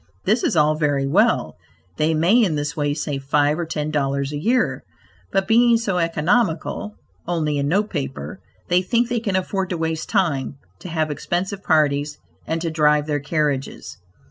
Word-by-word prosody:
This 220 +5 +2
is - - +1
all 150 0 +4
very 145 -3 0
well; 135 - +2 0.4
they 160 +1 +1
may 185 +10 +4
in 175 -7 +1
this 150 +1 -3
way 145 -2 -1
save 145 -2 -3
five 145 +3 +2
or 170 - -2
ten 155 -2 -3
dollars 140 -1 -1
a 145 - -3
year, 215 - +1 0.5
but 195 0 0
being 235 +1 +5
so 195 -6 -1
economical 170 +4 0 0.3
(only 155 -4 0
in 140 - 0
note 205 +7 +1
paper), 140 +8 -5 0.3
they 180 0 +3
think 235 +5 0
they 240 -1 0
can 205 -4 -2
afford 190 0 -1
to 180 - -2
waste 160 -1 -3
time; 150 - 0 0.2
to - - -8
have 155 -2 -1
expensive 185 +6 -3
parties, 150 -2 +1 0.3
and 165 0 -2
to 165 - -1
drive 150 -1 +3
their 150 -1 -1
carriages. 145 -4 -2
160 Hz, 175 wpm, -21 LUFS, 145-190 Hz, 0.5 s, being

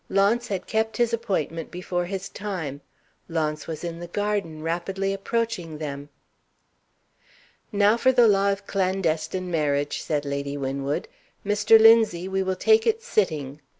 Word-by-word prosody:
Launce 205 +5 +2
had 195 -3 -3
kept 220 0 -1
his 235 -1 +1
appointment 165 -8 -2
before 175 0 -3
his 195 +1 -4
time. 170 -9 -5 0.5
Launce 155 -2 -2
was 160 -1 -6
in 170 -1 -5
the 175 - -7
garden, 200 -5 -2
rapidly 190 +4 -2
approaching 195 -5 -2
them. 145 -1 -6 1.6
"Now 205 +1 +4
for 260 +2 +4
the 245 -2 +5
Law 200 -1 +3
of 200 0 -4
Clandestine 185 -2 -1
Marriage!" 145 -2 0
said 150 -2 -2
Lady 140 0 -3
Winwood. 140 +1 -2 0.4
"Mr. 210 +2 +5
Linzie, 220 -6 +5
we 190 0 -1
will 190 0 -1
take 440 - +3
it 455 0 +1
sitting." 155 - -1
185 Hz, 145 wpm, -25 LUFS, 155-210 Hz, 1.6 s, the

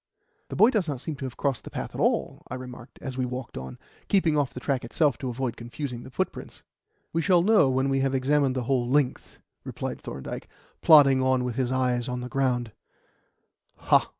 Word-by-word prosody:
"The - - -5
boy 225 +4 +6
does 210 -8 0
not 140 -4 -3
seem 155 +4 -5
to 140 - -5
have 130 - -7
crossed 140 -5 -1
the - - -8
path - - -5
at - - -4
all," - - 0
I 130 - -4
remarked 125 -1 -10
as 130 -2 -5
we 130 - +1
walked 125 -1 -6
on, 65 0 -7 0.3
keeping 175 -6 +3
off 145 -3 +1
the - - -7
track 135 0 -1
itself 145 +4 +1
to 130 -3 -3
avoid 125 0 -3
confusing 120 +1 -6
the - - -10
footprints. 125 - -4 0.5
"We 165 - +1
shall 175 +2 +4
know 210 -8 +5
when 130 +1 +1
we 135 0 +1
have 135 0 +1
examined 135 0 +2
the 130 - -1
whole 125 -1 0
length," 135 -1 0 0.3
replied - - -5
Thorndyke, 65 +1 -7 0.3
plodding 140 -4 +7
on 130 -1 +2
with 125 -1 -2
his 125 0 -1
eyes 125 -1 0
on 125 0 -3
the 125 - -6
ground. 125 -4 0
130 Hz, 205 wpm, -26 LUFS, 125-145 Hz, 0.5 s, plodding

